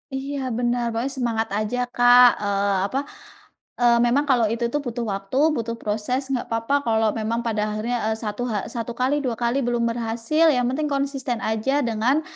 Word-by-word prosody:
Iya 275 +1 -4 0.2
benar, 240 0 0
pokoknya 245 +4 -1
semangat 225 -2 0
aja 215 +3 -2 0.2
Kak, 245 +1 +7
eee, 200 -1 0
apa, 260 +6 -2 0.8
eee, 240 -1 +5
memang 255 +4 +3
kalau 240 -4 +4
itu 230 +2 -2
tuh 295 - 0
butuh 240 0 -3
waktu, 195 +3 -6 0.2
butuh 230 -3 -3
proses, 240 +6 -2
enggak 255 -3 -1
apa-apa 230 +4 -1
kalau 220 -1 +2
memang 225 +2 -2
pada 215 -2 0
akhirnya, 215 +3 -2
eee, 220 - +1
1 215 +3 -3
ha 215 -5 -2
1 235 0 -5
kali 255 +4 +1
2 255 -5 -2
kali 240 +3 +1
belum 240 -1 0
berhasil 235 +7 0
yang 250 -1 +1
penting 300 +4 -1
konsisten 275 -4 -2
aja 220 +7 0
dengan, 240 +5 +1
235 Hz, 180 wpm, -23 LUFS, 220-255 Hz, 0.8 s, Kak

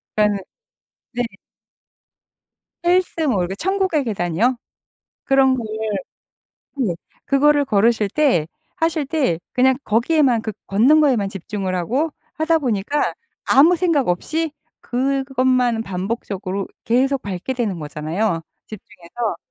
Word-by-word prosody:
그니까는 210 -1 +2 0.7
네. 245 0 -1 1.6
헬스 355 -1 +2
뭐 210 -8 +2
이렇게 180 +2 -2
천국의 380 - 0
계단이요? 215 +3 0 0.7
그런 270 -1 +4
거를 230 -4 -5 1.1
네 210 -10 0 0.3
그거를 290 +1 +3
걸으실 220 -3 +2
때 250 - +2 0.3
하실 325 -3 0
때 275 - 0
그냥 260 +1 +3
거기에만 245 +1 +2
그 220 - -3
걷는 250 +11 +4
거에만 250 -10 +2
집중을 195 -1 -4
하고 255 - 0 0.2
하다 320 +1 +2
보니까 250 +2 -1 0.3
아무 320 +6 +6
생각 325 - +1
없이 315 - -1 0.3
그것만 255 -2 +1
반복적으로 195 -1 -4 0.2
계속 265 +3 +1
밟게 200 +6 -4
되는 220 -8 -2
거잖아요 160 +5 -2 0.2
집중해서. 190 0 -6
245 Hz, 255 characters per minute, -20 LUFS, 200-285 Hz, 1.6 s, 아무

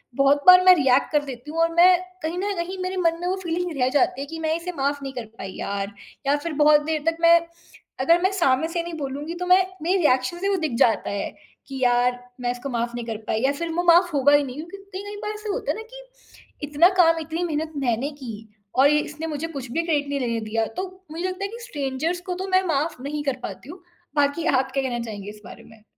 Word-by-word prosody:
बहुत 280 +1 +3
बार 365 0 +10
मैं 365 -1 +9
रिएक्ट 265 -3 +2
कर 295 -1 +2
देती 265 +2 -8
हूँ 330 - -3
और 330 0 +3
मैं 360 +1 +7 0.3
कहीं 330 +3 -2
न 405 +1 -1
कहीं 360 +3 -3
मेरे 370 +1 -3
मन 335 -2 +1
में 355 - -2
वो 375 - 0
फ़ीलिंग 345 +1 -2
रह 250 - +3
जाती 270 -1 +1
हैं, 280 - -5
कि 325 0 -6
मैं 320 0 0
इसे 350 +2 -4
माफ 280 +1 -1
नहीं 270 0 -5
कर 245 -3 -5
पाई 190 -1 -7
यार। 200 0 -3 0.3
या 285 - +4
फिर 310 +2 -5
बहुत 300 0 +6
देर 315 -2 -1
तक 330 0 +2
मैं 335 0 +7 0.6
अगर 335 +6 +4
मैं 375 +1 +2
सामने 320 -5 +2
से 335 0 -2
नहीं 340 0 -7
बोलूँगी 285 +4 -4
तो 360 +1 -4
मैं 370 +1 +5 0.2
मेरी 365 +4 +1
रिएक्शन 260 0 +2
से 395 +1 0
वो 395 - +2
दिख 310 -7 -2
जाता 235 -4 +2
है, 200 +1 -4 0.3
कि 270 -1 -6
यार 245 0 +3 0.2
मैं 245 0 0
इसको 245 +3 -6
माफ 235 -1 -2
नहीं 240 -1 -5
कर 225 -2 -4
पाई 220 - 0
या 270 - +3
फिर 335 +4 -4
वो 350 +1 0
माफ 350 0 +5
होगा 285 +1 +4
ही 290 0 +5
नहीं, 255 -1 -7
क्योंकि 340 +5 -8 0.2
कई-कई 405 +2 -6
बार 420 - -3
ऐसा 425 0 -7
होता - - -2
है - - -4
ना, 445 - -6
कि - - -13
इतना 305 +5 +5
काम, 330 -1 +5
इतनी 325 +3 -3
मेहनत 315 0 -3
मैंने 245 +5 0
की 225 -3 -8 0.3
और 270 +2 +6
ये 300 0 +4
इसने 305 +2 -5
मुझे 310 +1 -3
कुछ 270 -6 -7
भी 330 +5 0
क्रेडिट 290 -4 0
नहीं 280 -1 -1
लेने 235 -2 -1
दिया। 225 0 0
तो 375 - -1 0.3
मुझे 335 +3 -5
लगता 370 +2 -5
है - - 0
कि 470 - -8
स्ट्रेंजर्स 300 - -2
को 360 - -1
तो - - -5
मैं 375 0 +3
माफ 300 -2 -1
नहीं 295 +2 -4
कर 275 -3 -1
पाती 275 - -7
हूँ, 360 +1 -11 0.3
बाकी 290 +3 +1
आप 265 -4 +1
क्या 270 0 -1
कहना 240 -2 -2
चाहेंगी 205 -2 -7
इस 210 0 -12
बारे - - -11
में? 220 -1 -18
300 Hz, 255 wpm, -23 LUFS, 265-345 Hz, 0.6 s, बार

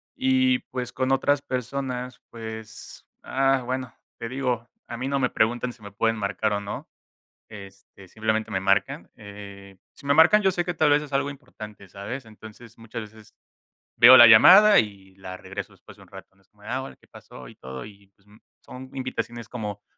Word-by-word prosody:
y 260 -1 +2
pues 125 -1 -5
con 130 0 -1
otras 145 +1 +2
personas, 125 -1 -5
pues, 110 -1 -10 0.2
ah, 135 -1 +1
bueno, 130 -1 -4 0.3
te 115 - -5
digo, 125 -2 -3 0.2
a 120 - -7
mí 130 - -4
no 140 0 -1
me 125 -2 +1
preguntan 120 +2 0
si 115 - -23
me 100 -1 -11
pueden 115 +3 0
marcar 105 +1 -2
o 100 - -1
no, 100 0 -7 0.6
este, 100 -2 -14
simplemente, 110 +2 -2
me 95 - -1
marcan, 100 +1 0
eh, 100 -1 -12 0.2
si - - -18
me 140 - +4
marcan 175 +7 +6
yo 195 - +3
sé 175 -1 -2
que, 175 - -2
tal 155 -2 +2
vez, 145 0 +3
es 145 -2 -12
algo 140 +1 0
importante, 110 -8 -12
¿sabes?, 115 +7 -7
entonces, 110 +1 -14
muchas 115 +1 -8
veces 110 0 -16 0.6
veo 125 +2 +9
la 120 - +10
llamada 190 - +8
y 95 -3 -3
la 95 -1 -9
regreso 95 +1 -8
después - - -17
de - - -18
un - - -23
rato, - - -14
¿no?, 95 - -29
es 95 - -36
como 105 -1 -27
de: - - -12
"Ah, 130 +2 -2
hola, 135 - -9
¿qué - - -27
pasó?", 65 - -13
y - - -15
todo. 65 0 -9
Y, 100 -2 -15
pues, 100 - -34 0.4
son 130 +1 -11
invitaciones 120 -3 -5
como 105 -4 -6
115 Hz, 200 wpm, -24 LUFS, 100-130 Hz, 0.6 s, la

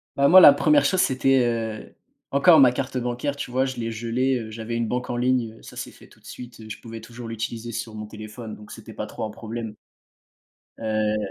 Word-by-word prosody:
Bah, 140 0 +4
moi 185 +4 +9
la 145 - +10
première 145 0 +3
chose, 185 +5 +2
c'était, 130 0 +3
heu 115 -2 -3 0.4
encore 155 +3 +6
ma 130 -3 +7
carte 130 +1 -4
bancaire, 125 +3 -2
tu 125 - -6
vois, 130 +1 +1
je 130 - -5
l'ai 115 -1 -3
gelé, 120 +4 0
heu, 110 -1 -7
j'avais 115 +1 -5
une 115 -1 -1
banque 125 +2 -3
en 120 - -2
ligne, 120 -2 0
heu, - - -20
ça - - -12
s'est - - -6
fait - - -17
tout - - -22
de - - -26
suite, 120 -2 -10
heu, 110 - -11
je - - -7
pouvais 115 -1 -9
toujours 115 +1 -10
l'utiliser 115 +1 -5
sur 110 0 -5
mon 105 - -6
téléphone 110 +1 -9
donc 105 0 -14
c'était - - -11
pas - - -5
trop - - -7
un 110 - -5
problème 110 -1 -7 1.0
heu, 110 -1 0
120 Hz, 235 wpm, -24 LUFS, 110-130 Hz, 1.0 s, la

